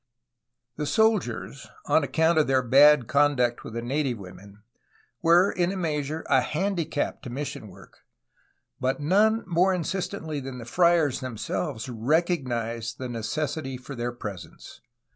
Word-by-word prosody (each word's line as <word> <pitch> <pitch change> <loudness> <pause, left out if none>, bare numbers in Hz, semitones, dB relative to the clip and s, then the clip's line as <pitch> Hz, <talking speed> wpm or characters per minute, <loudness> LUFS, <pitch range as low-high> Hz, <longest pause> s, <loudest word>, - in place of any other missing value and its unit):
The 150 -1 -2
soldiers, 155 - 0 0.2
on 160 - +3
account 160 +4 +2
of 155 - +2
their 130 -1 +2
bad 140 +2 +6
conduct 140 -4 +2
with - - -9
the 115 - -3
native 135 -1 -1
women, 100 +1 -13 0.6
w^ere 175 +4 +4
in 175 0 +1
a 195 - -4
measure 155 -2 -2
a 130 - +4
handicap 160 0 -2
to - - -8
mission 130 -3 -5
work, 95 - -16 0.8
but 130 +1 -1
none 210 +9 +3
more 185 +1 +2
insistently 175 -3 -3
than 135 -1 -7
the 115 - -8
friars 165 -2 +2
themselves 110 -4 -4
recog 150 +7 0
nized 115 -2 -3
the 130 -1 -5
necessity 135 +4 -3
for 125 +3 -10
their 120 -1 -3
presence. 105 -6 -9
140 Hz, 145 wpm, -26 LUFS, 120-165 Hz, 0.8 s, bad